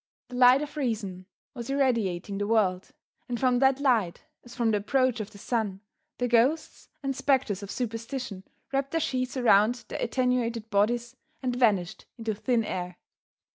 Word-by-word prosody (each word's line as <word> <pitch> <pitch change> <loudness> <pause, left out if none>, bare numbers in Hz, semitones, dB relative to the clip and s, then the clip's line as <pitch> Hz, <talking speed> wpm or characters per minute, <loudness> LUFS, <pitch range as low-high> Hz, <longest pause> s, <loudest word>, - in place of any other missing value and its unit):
The 250 - -8
light 250 +3 +6
of 300 +1 -8
reason 205 -9 -3 0.3
was 240 -2 -7
irradiating 215 -9 0
the 205 - -1
world, 195 -5 +1 0.4
and 240 -1 -2
from 250 -2 +3
that 265 0 +4
light, 230 -11 +1 0.2
as 240 0 -13
from 235 -3 +1
the 210 - +2
approach 250 +3 +1
of 215 -1 -4
the 210 - -14
sun, 205 -3 -2 0.4
the 245 - 0
ghosts 245 +7 +1
and 270 -1 -1
spectres 260 -8 +1
of 200 - -8
superstition 230 -2 -4 0.3
wrapped 275 0 0
their 330 - +2
sheets 255 -3 -2
around 230 0 +4
their - - -5
attenuated 235 -2 0
bodies 235 +4 +1 0.3
and 250 -1 0
vanished 210 -6 +1
into 225 -2 -2
thin 230 +2 0
air. 180 -2 -4
235 Hz, 165 wpm, -27 LUFS, 205-255 Hz, 0.4 s, light